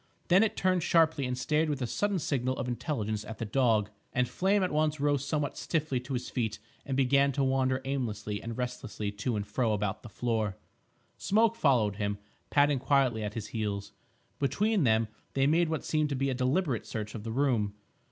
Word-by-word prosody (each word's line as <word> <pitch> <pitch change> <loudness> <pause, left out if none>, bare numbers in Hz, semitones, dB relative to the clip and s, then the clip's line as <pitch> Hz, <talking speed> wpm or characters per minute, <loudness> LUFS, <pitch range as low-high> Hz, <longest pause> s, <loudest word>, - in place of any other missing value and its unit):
Then 185 +2 +6
it 220 - +1
turned 185 -1 +2
sharply 160 -5 +3
and 125 0 -2
stared 155 +4 +1
with 145 -2 -1
a 125 - -1
sudden 185 - 0
signal 130 -5 -1
of 130 - -3
intelligence 110 -5 -2
at 110 +1 -8
the 115 - -3
dog, 110 -3 +2 0.2
and 125 0 +2
Flame 195 +6 +1
at 185 - 0
once 155 0 +1
rose 145 -1 +1
somewhat 145 -1 -1
stiffly 155 -5 -1
to 125 +2 -6
his 125 0 -3
feet 110 -3 -2 0.3
and 135 -1 -1
began 140 +1 +4
to 140 - +1
wander 130 0 +1
aimlessly 110 -6 -3
and 115 -1 -6
restlessly 120 -4 -4
to 110 +4 -2
and 100 -1 -2
fro 115 0 0
about 105 -1 -2
the - - -10
floor. 110 -5 -1 0.6
Smoke 225 +3 +3
followed 115 - +2
him, 100 -1 -1 0.3
padding 145 -1 +3
quietly 135 -4 +2
at 105 0 -4
his 110 -3 -5
heels. 100 -2 -3 0.5
Between 185 - +2
them 110 -1 +3 0.3
they 135 0 +3
made 165 +3 +3
what 160 -3 -2
seemed 155 -1 +1
to 140 - -1
be 135 +1 0
a - - 0
deliberate 130 - 0
search 105 -1 -4
of 110 - -6
the 115 - -4
room. 115 -6 +1
130 Hz, 200 wpm, -30 LUFS, 110-150 Hz, 0.6 s, Then